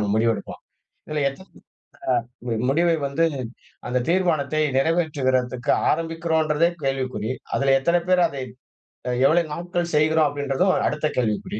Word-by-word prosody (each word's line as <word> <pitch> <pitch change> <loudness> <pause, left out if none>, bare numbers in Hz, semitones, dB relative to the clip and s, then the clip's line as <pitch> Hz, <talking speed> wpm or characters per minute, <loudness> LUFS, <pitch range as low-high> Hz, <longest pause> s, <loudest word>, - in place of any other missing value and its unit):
நம்ம 105 - -1
முடிவு 115 +1 +3
எடுப்போம். - - -8 0.5
இதுல 150 -1 -2
எத் 135 - -9
ஆ - - -15 1.2
முடிவை 165 +4 +3
வந்து 140 +4 +1 0.6
அந்தத் 125 0 -1
தீர்மானத்தை 155 -5 +1 0.2
நெறைவேற்றுகிறதுக்கு 135 -5 +1 0.2
ஆரம்பிக்கிறோன்றதே 165 0 +1
கேள்விக்குறி. 130 -4 -2 0.2
அதுல 135 -1 +3
எத்தனை 170 +5 +2
பேரு 180 -1 +4
அதை 135 -2 -6 0.8
எவ்வளவு 160 +2 +3
நாட்கள் 175 0 -3
செய்கிறோம்? 155 0 +3
அப்படிங்கறதும் 145 +6 0
அடுத்த 150 +1 -1
கேள்விக்குறி. 110 -2 -1
150 Hz, 120 wpm, -23 LUFS, 135-165 Hz, 1.2 s, பேரு